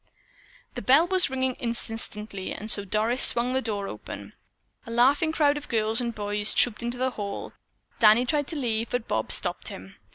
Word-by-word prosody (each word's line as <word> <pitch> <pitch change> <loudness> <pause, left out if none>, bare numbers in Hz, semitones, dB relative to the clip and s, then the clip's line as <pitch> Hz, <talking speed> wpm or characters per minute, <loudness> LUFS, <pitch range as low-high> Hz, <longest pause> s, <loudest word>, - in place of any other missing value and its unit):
The - - -6
bell 280 +6 +5
was 370 -3 +1
ringing 260 -1 -1
insistently 225 -4 -4
and 215 +1 -2
so 200 - +4
Doris 215 +6 -1
swung 240 +1 +4
open - - -2
the 260 - 0
door. 195 - -6 0.6
A - - -7
laughing 270 +7 +3
crowd 295 -2 +2
of 295 - -9
girls 220 0 +3
and 235 -2 -3
boys 205 0 -2
trooped 240 -2 +3
into 240 +1 -2
the 260 +1 0
hall. 200 -4 -6 0.5
Danny 225 +2 +6
tried 290 +1 0
to 330 - -6
leave 230 -5 -2
but 245 -2 -3
Bob - - -2
stopped - - 0
him. - - -10
235 Hz, 185 wpm, -26 LUFS, 215-260 Hz, 0.6 s, Danny